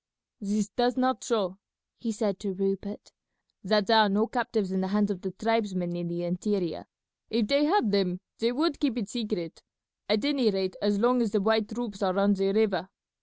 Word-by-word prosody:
"This 205 Hz, 0 st, -1 dB
does 245 Hz, +2 st, 0 dB
not 255 Hz, 0 st, +1 dB
show," 200 Hz, -6 st, -1 dB, 0.4 s
he 230 Hz, -, -3 dB
said 205 Hz, -3 st, -2 dB
to 200 Hz, -2 st, -3 dB
Rupert, 195 Hz, +1 st, -3 dB, 0.5 s
"that 210 Hz, +1 st, +2 dB
there 225 Hz, +1 st, +5 dB
are 215 Hz, -1 st, +5 dB
no 210 Hz, +3 st, +2 dB
captives 225 Hz, -5 st, -1 dB
in 190 Hz, 0 st, 0 dB
the 190 Hz, -, -1 dB
hands 205 Hz, +1 st, +1 dB
of 185 Hz, -3 st, -5 dB
the 190 Hz, -, -3 dB
tribesmen 190 Hz, -4 st, -1 dB
in 175 Hz, 0 st, -4 dB
the 170 Hz, 0 st, -4 dB
interior. 180 Hz, -1 st, -2 dB, 0.4 s
If 225 Hz, -1 st, +1 dB
they 280 Hz, +3 st, +3 dB
had 305 Hz, -, +2 dB
them 185 Hz, -3 st, +1 dB, 0.2 s
they 230 Hz, +1 st, +2 dB
would 295 Hz, +4 st, 0 dB
keep 270 Hz, -5 st, 0 dB
it 215 Hz, -4 st, -3 dB
secret, 210 Hz, -9 st, -4 dB, 0.5 s
at 210 Hz, +4 st, +2 dB
any 275 Hz, -6 st, +3 dB
rate 190 Hz, -2 st, -1 dB
as 205 Hz, 0 st, +2 dB
long 245 Hz, +3 st, +3 dB
as 230 Hz, -, +1 dB
the 210 Hz, -, +2 dB
white 220 Hz, +1 st, +2 dB
troops 220 Hz, -3 st, -5 dB
are 190 Hz, -1 st, +1 dB
on 200 Hz, +1 st, +4 dB
the 195 Hz, 0 st, +1 dB
river. 195 Hz, -4 st, +1 dB
210 Hz, 200 wpm, -28 LUFS, 195-230 Hz, 0.5 s, there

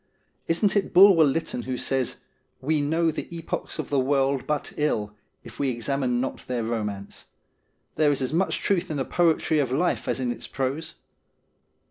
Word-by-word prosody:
Isn't 195 Hz, +5 st, +2 dB
it 200 Hz, -, 0 dB
Bulwer 185 Hz, -2 st, +8 dB
Lytton 150 Hz, -3 st, 0 dB
who 125 Hz, +1 st, -4 dB
says: 130 Hz, -1 st, -1 dB, 0.2 s
' -, -, -46 dB
We 155 Hz, -2 st, +3 dB
know 160 Hz, +3 st, +1 dB
the -, -, -5 dB
epochs 165 Hz, -1 st, -4 dB
of 155 Hz, -3 st, -5 dB
the 140 Hz, -, +3 dB
world 135 Hz, 0 st, +1 dB
but 150 Hz, -1 st, -2 dB
ill 105 Hz, -9 st, -1 dB, 0.3 s
if 115 Hz, -1 st, -12 dB
we 140 Hz, -, +1 dB
examine 125 Hz, +1 st, -1 dB
not 130 Hz, -, -4 dB
their 125 Hz, -2 st, -2 dB
romance. 105 Hz, -3 st, -4 dB, 0.7 s
There 155 Hz, -1 st, +4 dB
is 145 Hz, -, +1 dB
as 130 Hz, -, -2 dB
much 185 Hz, +4 st, +1 dB
truth 195 Hz, -4 st, +1 dB
in 155 Hz, -, -2 dB
the 135 Hz, -, -1 dB
poetry 160 Hz, -2 st, +2 dB
of 135 Hz, -4 st, 0 dB
life 170 Hz, +7 st, 0 dB
as -, -, -1 dB
in 125 Hz, -2 st, -1 dB
its -, -, -6 dB
prose 135 Hz, +4 st, -3 dB
140 Hz, 180 wpm, -25 LUFS, 125-160 Hz, 0.7 s, Bulwer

